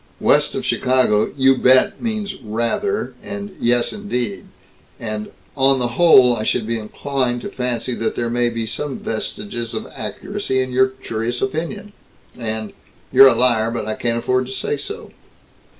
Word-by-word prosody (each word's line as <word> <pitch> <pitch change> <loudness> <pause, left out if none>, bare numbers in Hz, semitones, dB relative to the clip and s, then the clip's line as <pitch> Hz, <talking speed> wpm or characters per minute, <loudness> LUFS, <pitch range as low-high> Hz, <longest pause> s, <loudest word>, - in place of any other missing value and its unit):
West - - +3
of - - -3
Chicago, 125 -5 +2
"You 135 0 +5
bet" 130 0 +4
means 215 -3 -2
"Rather," 115 - -2
and 200 -1 -7
"Yes 120 - +1
indeed," 125 - -3 0.5
and 110 -1 -4 0.3
"On 135 -1 +4
the 120 -2 -1
whole 125 -3 +6
I 110 - -4
should 110 +1 0
be 115 +1 -2
inclined 120 +2 -2
to - - -5
fancy 125 -1 -2
that 115 -1 -2
there 120 -1 -2
may 120 0 +1
be 115 -1 -3
some 135 +5 -3
vestiges 115 +1 -4
of - - -4
accuracy 130 - -3
in 130 0 -1
your 130 +1 +4
curious 120 -2 -4
opinion," 200 +3 -4 0.4
and 110 -3 -4 0.4
"You're 135 - +9
a - - +4
liar 115 -3 +4
but 115 -2 -3
I 110 - -2
can't 115 +1 -1
afford 130 +2 0
to 130 - -6
say 135 - -1
so." 140 - -7
125 Hz, 165 wpm, -20 LUFS, 115-135 Hz, 0.5 s, You're